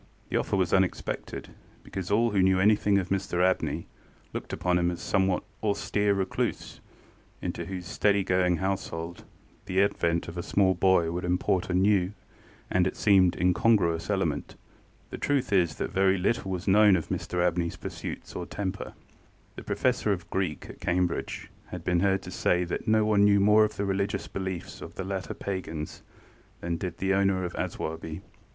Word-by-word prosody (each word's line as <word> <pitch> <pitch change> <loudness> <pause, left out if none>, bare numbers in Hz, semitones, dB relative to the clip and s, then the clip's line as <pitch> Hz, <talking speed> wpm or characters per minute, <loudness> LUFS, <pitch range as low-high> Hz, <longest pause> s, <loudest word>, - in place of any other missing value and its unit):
The - - 0
offer - - 0
was 95 -2 +1
unexpected, 95 -1 -1 0.3
because 95 -2 -6
all 115 +3 +3
who 100 -2 +2
knew 95 0 +4
anything 105 0 +4
of 95 -2 -1
Mr 95 -2 0
Abney 95 - 0 0.5
looked - - -5
upon 90 -1 +1
him 85 0 +2
as 90 - -3
a - - -11
somewhat 95 -2 +1 0.2
austere 105 -1 +1
recluse, 95 -1 -2 0.6
into - - -4
whose 95 -2 -6
steady 100 +2 +2
going 90 -1 +2
household 85 -3 -3 0.4
the 95 +1 0
advent 85 -4 +1
of 85 +1 -6
a - - -1
small 95 +1 +2
boy 85 -2 +3
would 90 +1 -3
import 90 +1 0
a 90 - 0
new 95 0 +3 0.6
and, 90 0 +3
it - - -4
seemed, 95 -4 +4
incongruous 90 -2 +2
element. - - -1 0.6
The - - -6
truth 140 -7 0
is 85 -5 +3
that - - -3
very 95 0 +3
little 95 +2 0
was 95 +1 -4
known 105 0 +6
of 85 - -3
Mr 90 0 0
AbneyŌĆÖs 85 -1 -2
pursuits - - -7
or - - -4
temper. 95 -2 -4 0.6
The - - -7
Professor - - 0
of - - -3
Greek 95 -5 -2
at - - -12
Cambridge 90 -1 -1 0.2
had - - -7
been 90 -1 +1
heard 95 +1 +2
to - - -8
say 90 0 +1
that 85 +6 -4
no 110 0 +4
one 105 -1 +4
knew 100 0 +5
more 105 +2 +6
of 105 - -1
the 100 - -2
religious 100 0 -1
beliefs 95 -2 -5
of - - -9
the 95 - -4
later 95 0 -4
pagans 80 -6 -5 0.6
than 85 0 -2
did 90 -1 -5
the 95 0 +1
owner 95 -1 +2
of 90 - -5
Aswarby. 80 0 -4
95 Hz, 175 wpm, -28 LUFS, 90-100 Hz, 0.6 s, known